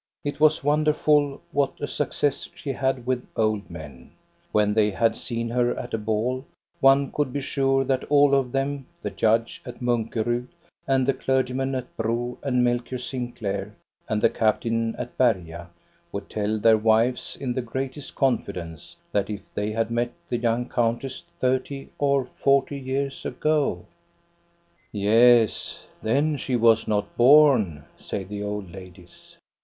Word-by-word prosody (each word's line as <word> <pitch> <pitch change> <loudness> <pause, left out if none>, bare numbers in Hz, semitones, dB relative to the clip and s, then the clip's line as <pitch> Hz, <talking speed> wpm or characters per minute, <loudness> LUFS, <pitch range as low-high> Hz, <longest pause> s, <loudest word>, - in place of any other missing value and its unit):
It 145 0 -4
was 155 -1 +4
wonderful, 150 -1 +2
what 140 -1 0
a 145 - -2
success 145 -1 -1
she 170 -5 -4
had 130 -2 -1
with 125 -1 -1
old 110 -2 0
men. 75 -7 -10 0.4
When 105 -1 +2
they 105 -1 +3
had 115 +3 +1
seen 115 -1 -4
her 120 0 +1
at 125 - -6
a 115 - 0
ball, 110 +5 -1 0.4
one 135 0 +4
could 145 -3 -1
be 140 - -3
sure 135 0 +1
that 130 -1 -1
all 145 -1 +5
of 135 -3 +2
them, 135 0 -2 0.2
the 105 - -3
judge 115 +3 +1
at 125 -1 -9
Munkerud 120 0 -1 0.4
and 135 -1 +2
the 135 - +2
clergyman 130 0 0
at 125 -1 -6
Bro 120 +2 -2
and 125 -3 +1
Melchior 120 +1 0
Sinclair 120 -6 -4 0.3
and 110 -1 -1
the - - +6
captain 115 +1 0
at 120 - -7
Berga, 85 -8 0 0.4
would - - -6
tell 105 0 -1
their 110 0 +5
wives 115 +3 +1
in 130 -3 -2
the 130 - -1
greatest 130 +3 -5
confidence 90 - -2 0.2
that 100 0 0
if 105 -1 -7
they 105 +1 -2
had 115 +1 -1
met 120 +1 -1 0.2
the 120 - 0
young 120 +1 0
countess 120 +3 -1 0.2
thirty 130 +2 -1
or 140 -2 +2
forty 140 +2 +1
years 135 +1 -3
ago 155 -2 0 0.5
— 170 0 -39
Yes, 115 +3 +3 0.2
then 145 +7 +1
she 130 -1 -2
was 115 -1 +4
not 105 -1 -1
born," 120 - +5
say 100 - -4
the 100 +2 -6
old 105 -3 -4
ladies. 90 -1 -14
120 Hz, 155 wpm, -25 LUFS, 110-135 Hz, 0.5 s, the